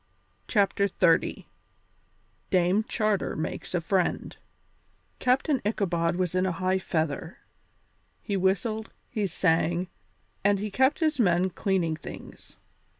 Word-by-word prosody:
CHAPTER 200 -2 +2
XXX 165 -3 +2 1.0
DAME 185 +3 +3
CHARTER 215 -4 0
MAKES 155 +3 -4
A 175 - +1
FRIEND 180 +1 -1 0.8
Captain 265 +2 +2
Ichabod 175 -5 0
was 180 -1 -1
in 185 0 +2
high 185 +1 0
feather. 160 -2 -2 0.9
He 205 - -2
whistled, 200 +4 0 0.2
he 210 -4 0
sang, 175 0 +1 0.5
and 200 0 +4
he 210 +1 -4
kept 265 - +2
his 310 -3 +1
men 180 -3 +3
cleaning 175 -4 0
things. - - -11
190 Hz, 110 wpm, -27 LUFS, 175-210 Hz, 1.0 s, and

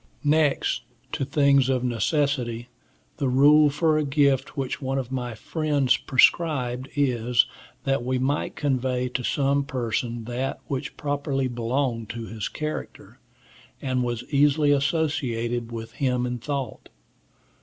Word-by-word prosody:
Next 150 -1 +2 0.3
to - - -2
things 140 -2 +3
of 130 -2 +1
necessity, 125 0 0 0.5
the 135 - 0
rule 145 +4 +6
for 155 +1 +2
a - - +1
gift 140 0 +1
which 135 0 -3
one 135 0 -1
of 130 -2 -3
my 125 -3 -3
friends 145 +1 +1
prescribed 130 -3 +2
is, 125 -4 +2 0.4
that 135 -2 0
we 130 +1 0
might 135 +3 -1
convey 130 -2 0
to 125 - -2
some 140 +2 +1
person 120 -3 -2
that 125 +4 -3
which 135 0 -4
properly 140 -2 -1
belonged 120 -1 -2
to 115 -1 -5
his 110 -2 -5
character, 155 0 -6 0.6
and 130 -2 -1
was 120 -1 -2
easily 145 +1 +4
associated 135 -6 0
with 115 -1 -6
him 125 -1 0
in 125 0 -3
thought. 135 +2 -4
130 Hz, 135 wpm, -25 LUFS, 120-145 Hz, 0.6 s, rule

